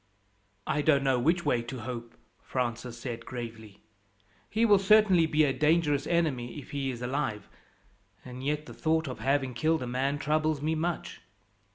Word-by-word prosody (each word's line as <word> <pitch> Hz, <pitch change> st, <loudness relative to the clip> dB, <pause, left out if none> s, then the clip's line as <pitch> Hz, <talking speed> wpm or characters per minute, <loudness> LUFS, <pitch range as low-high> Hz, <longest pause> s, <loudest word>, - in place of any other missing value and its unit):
"I 150 Hz, -, 0 dB
don't 145 Hz, -2 st, +3 dB
know 135 Hz, -2 st, +2 dB
which 170 Hz, +7 st, +1 dB
way 120 Hz, -, +2 dB
to 120 Hz, +1 st, -7 dB
hope," 120 Hz, 0 st, -6 dB, 0.3 s
Francis 120 Hz, -1 st, -3 dB
said 120 Hz, -2 st, -5 dB
gravely. 110 Hz, -5 st, -8 dB, 0.7 s
"He 225 Hz, +2 st, +2 dB
will 205 Hz, -3 st, +6 dB
certainly 195 Hz, -4 st, +5 dB
be 155 Hz, 0 st, +3 dB
a 140 Hz, -3 st, +2 dB
dangerous 150 Hz, 0 st, +2 dB
enemy 155 Hz, -8 st, 0 dB
if 145 Hz, -, -9 dB
he 140 Hz, -1 st, -2 dB
is 125 Hz, -1 st, -5 dB
alive; 125 Hz, -5 st, -2 dB, 0.8 s
and 125 Hz, 0 st, -8 dB
yet 150 Hz, +2 st, -1 dB
the -, -, -10 dB
thought 160 Hz, 0 st, 0 dB
of 130 Hz, -, -6 dB
having 135 Hz, -2 st, 0 dB
killed 155 Hz, +2 st, +1 dB
a -, -, -3 dB
man 130 Hz, +3 st, -1 dB
troubles 155 Hz, +1 st, 0 dB
me 155 Hz, +3 st, 0 dB
much." 165 Hz, +1 st, -3 dB
140 Hz, 170 wpm, -29 LUFS, 125-155 Hz, 0.8 s, will